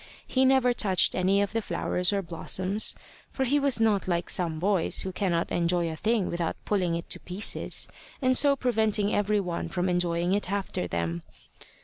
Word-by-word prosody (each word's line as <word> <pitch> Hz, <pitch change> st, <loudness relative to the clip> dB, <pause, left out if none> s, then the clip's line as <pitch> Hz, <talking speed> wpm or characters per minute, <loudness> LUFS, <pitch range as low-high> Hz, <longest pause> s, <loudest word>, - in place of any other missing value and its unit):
He 260 Hz, 0 st, +1 dB
never 260 Hz, -2 st, +3 dB
touched 190 Hz, -6 st, +2 dB
any 195 Hz, +2 st, +2 dB
of 200 Hz, -, -4 dB
the 225 Hz, -, 0 dB
flowers 180 Hz, -3 st, -1 dB
or 200 Hz, -1 st, -1 dB
blossoms, 185 Hz, +4 st, 0 dB, 0.3 s
for 265 Hz, -, -3 dB
he 285 Hz, +4 st, +2 dB
was 280 Hz, -4 st, +2 dB
not 215 Hz, -4 st, +1 dB
like 175 Hz, -1 st, 0 dB
some 165 Hz, -3 st, 0 dB
boys 185 Hz, +1 st, +2 dB
who 190 Hz, -, -4 dB
cannot 180 Hz, -3 st, -1 dB
enjoy 170 Hz, -1 st, 0 dB
a -, -, -6 dB
thing 215 Hz, +3 st, 0 dB
without 170 Hz, -1 st, -2 dB
pulling 180 Hz, -5 st, 0 dB
it 170 Hz, -, -5 dB
to -, -, 0 dB
pieces, 185 Hz, +4 st, 0 dB, 0.3 s
and 255 Hz, -2 st, +3 dB
so 280 Hz, +1 st, +5 dB
preventing 220 Hz, -5 st, +1 dB
every 205 Hz, 0 st, +1 dB
one 180 Hz, -3 st, -4 dB
from 180 Hz, -1 st, -2 dB
enjoying 175 Hz, 0 st, 0 dB
it 200 Hz, -2 st, -1 dB
after 200 Hz, -, -3 dB
them. 85 Hz, 0 st, -3 dB
190 Hz, 185 wpm, -27 LUFS, 175-220 Hz, 0.3 s, so